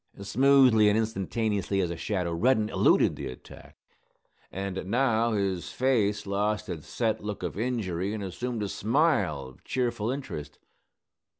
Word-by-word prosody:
Smoothly 125 0 +5
and 105 - +2
instantaneously 105 -2 -1
as 90 -3 0
a - - -3
shadow 90 -1 -2
Reddin 110 +4 +2
eluded - - +3
the - - -5
attack. 65 - -12 0.7
And 95 0 -4
now 115 0 +2
his 95 -4 -1
face 110 -6 +1
lost 105 +1 -1
its 80 -4 -6
set 110 -4 -1
look 105 -2 -5
of 90 - -3
injury 100 -5 -2
and 105 -2 -4
assumed 115 +4 -4
a - - -1
smile 110 - +1
of 65 -1 -14
cheerful 120 -3 -1
interest. 75 - -5
105 Hz, 140 wpm, -27 LUFS, 95-120 Hz, 0.7 s, Smoothly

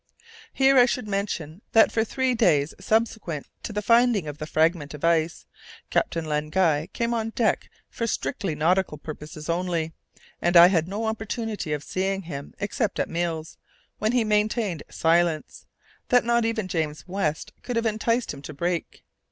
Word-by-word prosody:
Here 270 -1 +5
I 245 - +7
should 250 -3 -2
mention 195 -4 -3
that 225 - +6
for 220 - +2
three 260 +2 0
days 155 -11 +2
subsequent 215 -9 -1 0.2
to - - -5
the 210 0 -3
finding 230 -6 +4
of 150 0 -6
the 155 - -5
fragment 155 -2 +1
of 150 - -12
ice, 165 -1 +1 0.5
Captain 165 -1 0
Len 150 0 -1
Guy 160 -2 +2
came 235 0 -1
on 225 -1 -1
deck 225 0 0 0.2
for 230 - -3
strictly 195 - -2
nautical 170 +1 +1
purposes 150 0 -8
only, 170 -2 -1 0.5
and 175 0 +4
I 170 +1 +10
had 165 -4 +1
no 205 +4 -3
opportunities 220 -6 -3
of 145 - -7
seeing 195 +1 -2
him 145 -4 -7
except 205 0 -1
at - - -1
meals, 165 -2 -3 0.4
when 215 +2 +1
he 245 -2 +3
maintained 210 -4 0
silence, 165 -1 +1 0.4
that 245 -1 +4
not 235 -1 +2
even 225 -3 -1
James 160 -2 -3
West 180 -5 -2
could 245 - -4
have 230 0 0
enticed 230 +1 0
him 140 - -10
to 150 +1 -9
break. 175 +2 -3
185 Hz, 170 wpm, -25 LUFS, 160-225 Hz, 0.5 s, I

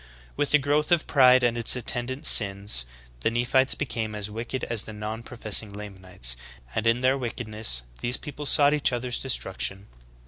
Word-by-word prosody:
With 145 - -2
the 150 - +4
growth 150 +3 -2
of 170 -2 +2
pride 130 -3 +4
and 120 -1 0
its 120 +1 +2
attendant 125 +3 -1
sins, 100 - +5 0.3
the - - -1
Nephites 120 +3 +1
became 115 -6 -5
as 105 0 -6
wicked 115 +4 -6
as 115 -3 -2
the 110 - -10
non 105 +2 -7
professing 110 -3 0
Lamanites 95 -11 -2 0.2
;' - - -25
and 110 +1 -2
in 115 +2 +1
their 130 +1 +1
wickedness 110 - +2 0.2
these 120 +1 -2
people 145 -1 -8
sought 145 0 +3
each 150 -2 +1
other's 120 0 -3
destruction. 95 -5 -2
115 Hz, 175 wpm, -24 LUFS, 105-130 Hz, 0.3 s, sins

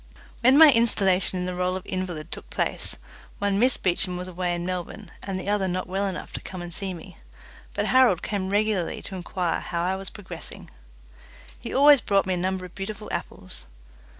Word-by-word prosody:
When 255 +3 +6
my 315 -1 +10
installation 195 -6 +3
in 180 - -2
the 180 - -2
role 180 +1 0
of 185 - -5
invalid 175 -4 -4
took - - -8
place, - - 0 0.4
one 200 -1 +1
Miss 250 +2 +4
Beecham 180 0 0
was 180 +1 -5
away 180 -1 -1
in 175 0 -4
Melbourne, 185 +2 -5
and 195 -1 -3
the 185 - -7
other 205 -2 +1
not 185 0 -1
well 195 +2 -1
enough 185 -1 -5
to - - -4
come 185 - -7
and 175 -1 -6
see 195 +2 -2
me, 180 +1 -10 0.6
but - - 0
Harold 255 -9 +4
came 195 -2 -2
regularly 205 -3 0
to 195 - -7
inquire 180 -1 -1
how 170 -1 -3
I 185 +2 +1
was 195 0 -5
progressing. 205 - -8 0.9
He - - -6
always 285 -1 +7
brought 200 -2 +2
me 185 - 0
a - - -1
number 185 +1 -1
of 180 - -12
beautiful 210 +2 -6
apples. - - -6
190 Hz, 200 wpm, -25 LUFS, 180-205 Hz, 0.9 s, my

